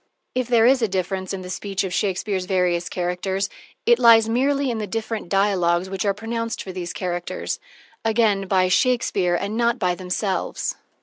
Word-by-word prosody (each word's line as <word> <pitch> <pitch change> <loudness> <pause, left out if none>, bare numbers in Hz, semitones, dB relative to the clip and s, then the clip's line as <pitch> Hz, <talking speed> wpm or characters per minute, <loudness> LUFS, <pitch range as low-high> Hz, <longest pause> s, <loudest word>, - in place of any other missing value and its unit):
If 255 -2 -1
there 235 -2 +4
is 260 +1 +5
a 225 - +3
difference 190 0 -2
in 190 -1 -4
the 180 - -8
speech 195 +1 -2
of 185 -2 -3
Shakespeare's 190 0 -1
various 180 -2 +1
characters, 185 +2 -2 0.3
it 240 +1 +5
lies 230 -2 +7
merely 275 +3 +1
in 225 - -3
the 210 - -3
different 220 -2 -4
dialogs 190 -2 +2
which 195 +1 -2
are 200 - +2
pronounced 230 +1 -3
for 190 - -7
these 180 -2 -5
characters 180 -3 -3 0.4
again 220 -3 +2
by 185 -1 +3
Shakespeare 195 -4 +2
and 200 +4 -2
not 235 0 +2
by 180 -1 +1
themselves. 185 +2 -2
195 Hz, 175 wpm, -23 LUFS, 185-225 Hz, 0.4 s, lies